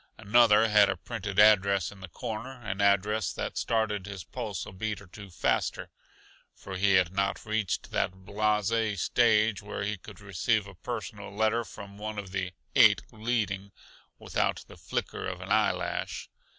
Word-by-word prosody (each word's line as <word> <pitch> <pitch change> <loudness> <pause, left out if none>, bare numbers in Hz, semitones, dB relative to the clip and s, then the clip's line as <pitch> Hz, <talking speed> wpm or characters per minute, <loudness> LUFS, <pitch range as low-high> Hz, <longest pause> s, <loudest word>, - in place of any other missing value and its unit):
Another 110 0 +5
had 105 -2 +5
a - - -1
printed 100 -4 -5
address 100 -3 +5
in 100 - -13
the 95 - -8
corner 120 +5 -6
an 100 -1 -3
address 100 +1 +2
that - - -4
started 110 -4 0
his 100 -3 -6
pulse 105 -2 -5
a - - -9
beat 105 +3 -3
or 100 - -13
two 100 +2 -11
faster; 85 - -1 0.6
for 95 - -8
he 95 +1 +3
had 90 -1 +3
not 100 0 0
yet - - -15
reached 110 -3 -2
that 95 +1 -2
blase 105 0 +1
stage 110 -3 +3
where 105 0 -5
he 105 -1 -2
could 100 +1 -12
receive 105 +2 0
a 100 - -11
personal 105 0 -6
letter 110 +3 +1
from 100 0 -11
one 105 0 -5
of 100 -2 -6
the 95 -1 -2 0.2
"Eight - - +6
Leading" 105 -4 -2 0.5
without - - -1
the - - -13
flicker - - -4
of 90 -1 -5
an 95 +2 -8
eye 110 0 +4
lash. 90 -1 -4
105 Hz, 175 wpm, -29 LUFS, 95-110 Hz, 0.6 s, Eight